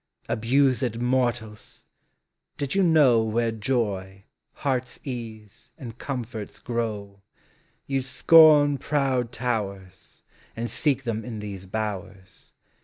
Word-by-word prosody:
Abused 125 0 +1
mortals! 120 -3 -2 0.7
did 140 -2 -2
you 195 - +2
know 150 -10 +5
Where 115 +1 0
joy, 105 -4 -2 0.3
heart's 130 -3 -2
ease, 110 -5 -8
and 120 -8 -8
comforts 120 -5 -5
grow, 105 -4 -4 0.6
You 135 -1 -1
'd - - -9
scorn 145 +1 +6
proud 135 -5 0
towers 100 -6 -5 0.3
And 115 +1 -4
seek 135 -3 0
them 115 -2 -3
in 115 -1 -6
these 100 -3 -7
bowers. 100 -2 -6
115 Hz, 110 wpm, -25 LUFS, 105-130 Hz, 0.7 s, scorn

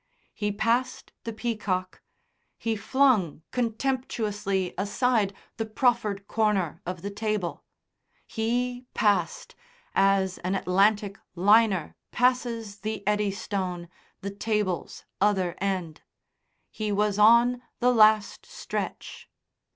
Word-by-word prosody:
He 210 -1 -2
passed 235 +5 -1
the 230 - -3
peacock, 210 -5 -3 0.6
he 225 -1 -1
flung 215 - +2
contemptuously 220 -6 -1
aside 205 +2 +1 0.3
the 225 - -2
proffered 215 -4 0
corner 200 -7 0
of 180 -1 -5
the 200 - -4
table; 210 -3 -3 0.6
he 245 +2 -2
passed, 205 -2 +1 0.4
as 195 -1 +2
an 185 +2 -2
Atlantic 200 +2 +2 0.2
liner 200 -2 +3 0.2
passes 235 -4 0
the 215 -2 -4
Eddystone, 195 -4 -1 0.3
the 200 - -4
table's 205 -4 -2 0.2
other 190 -4 +2
end; 185 -5 -2 0.7
he 215 -1 -3
was 205 0 +1
on 235 +3 +5 0.2
the 250 0 +3
last 215 -2 +4
stretch. - - -6
210 Hz, 100 wpm, -27 LUFS, 195-230 Hz, 0.7 s, on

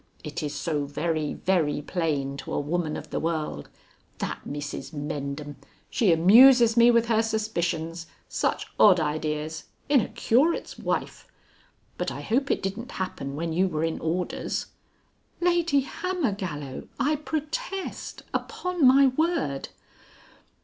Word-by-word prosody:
It 150 +2 -5
is 145 -1 -3
so 145 0 -1
very, 155 +1 -2
very 165 -6 +1
plain, 145 -4 -2
to - - -6
a - - +1
woman 155 +2 -1
of 150 0 -9
the - - -1
world. 155 - -3 0.5
That - - -3
Mrs 145 +2 -5
Mendham! 145 -1 -5 0.3
She 210 -7 +3
amuses 230 +8 +7
me 235 0 +7
with 235 -1 +4
her 225 -1 +3
suspicions. 170 -7 -2 0.2
Such - - -1
odd 190 -4 +7
ideas! 155 0 -2 0.2
In 280 -4 +5
a - - -3
Curate's 245 +8 +1
wife. - - -3 0.7
But - - 0
I - - -6
hope 270 +5 0
it - - 0
didn't 205 +6 -4
happen 140 -7 -4
when 165 +2 -2
you 185 +3 +3
were 155 -3 -2
in 165 0 -1
orders." 175 +3 -2 0.7
"Lady 345 -5 +3
Hammergallow, 200 - -3
I 300 +2 +2
protest. 320 - -4
Upon 360 -8 -2
my 270 +2 +7
word." 265 - 0
175 Hz, 135 wpm, -26 LUFS, 150-255 Hz, 0.7 s, amuses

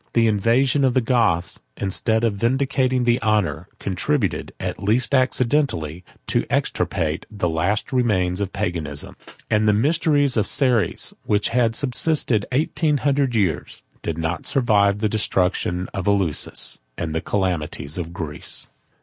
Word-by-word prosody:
The 115 -1 +3
invasion 115 +6 +2
of 130 -2 +2
the - - +5
Goths, 115 -8 +1 0.2
instead 110 +3 0
of 115 -3 +2
vindicating 130 +3 +1
the 120 +1 +2
honor, 105 -9 0
contributed, 100 - -1
at - - -4
least 115 +7 +1
accidentally, 125 - +1 0.2
to - - +1
extirpate 80 0 -1
the 100 -4 -2
last 90 - -1
remains 100 -7 +1
of 100 -1 -2
Paganism: 85 -8 -4 0.4
and 110 0 +3
the 105 - +5
mysteries 145 +2 +2
of 105 - +1
Ceres, 120 -10 +1
which 105 0 +1
had 115 -2 +1
subsisted 125 -4 +1
eighteen 150 +2 +1
hundred 140 -3 +1
years, 95 -8 -1 0.2
did 80 - -3
not 80 0 -3
survive 105 -6 +3
the 110 - +2
destruction 90 -3 0
of 95 -1 -4
Eleusis, 95 -7 +1 0.2
and 80 -1 -3
the 80 - -1
calamities 90 -5 -2
of 85 -1 -5
Greece. 80 -5 -1
105 Hz, 140 wpm, -22 LUFS, 90-125 Hz, 0.4 s, the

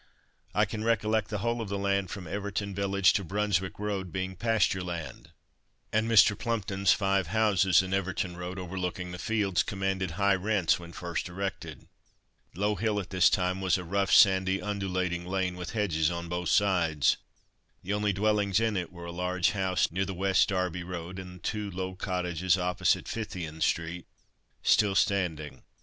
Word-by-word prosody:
I - - +4
can 110 0 -5
recollect 110 -1 +1
the 105 - -3
whole 120 0 0
of 110 - -5
the 100 - -2
land 100 -1 0
from 95 -2 -6
Everton 100 +2 -3
Village 100 0 +3
to 100 - 0
Brunswick 95 0 -1
Road 100 -3 -3
being 95 0 -3
pasture 110 -2 +1
land, 85 -4 -6 0.6
and 110 +1 +1
Mr. 110 -2 +6
Plumpton's 100 -5 0
five 95 -3 +2
houses 95 -2 +3
in 95 0 -4
Everton 95 -2 -1
Road, 90 +2 -6
overlooking 90 -1 -4
the 90 - -7
fields, 100 -2 +1
commanded 95 -2 -2
high 100 0 +3
rents 95 -3 +1
when 85 0 -10
first 85 0 -4
erected. 95 +2 -5 0.7
Low 105 +3 +1
hill 105 +1 0
at 95 - -7
this 95 -2 +5
time 90 0 0
was 95 -1 +2
a 90 - -5
rough, 100 +3 0
sandy, 95 0 +5
undulating 95 -3 -2
lane 95 -1 -1
with 90 0 -6
hedges 85 -8 +1
on 85 0 -4
both 85 -1 -2
sides. 85 -8 +3 0.7
The 100 - -2
only 105 0 +1
dwellings 100 0 +1
in 115 -2 0
it 90 -2 -3
were 85 -1 -10
a 85 - -6
large 90 +1 0
house 95 -5 0
near 95 +3 0
the 95 0 -5
West 95 +1 +2
Derby 90 -2 -1
road, 90 +1 -6
and 90 -1 -10
two 105 -2 -2
low 95 0 -4
cottages 90 -2 0
opposite 90 -1 +1
Phythian 85 -8 -5
street, 85 +2 -1 0.6
still 105 -3 +4
standing. 80 -9 0
95 Hz, 170 wpm, -29 LUFS, 90-100 Hz, 0.7 s, Mr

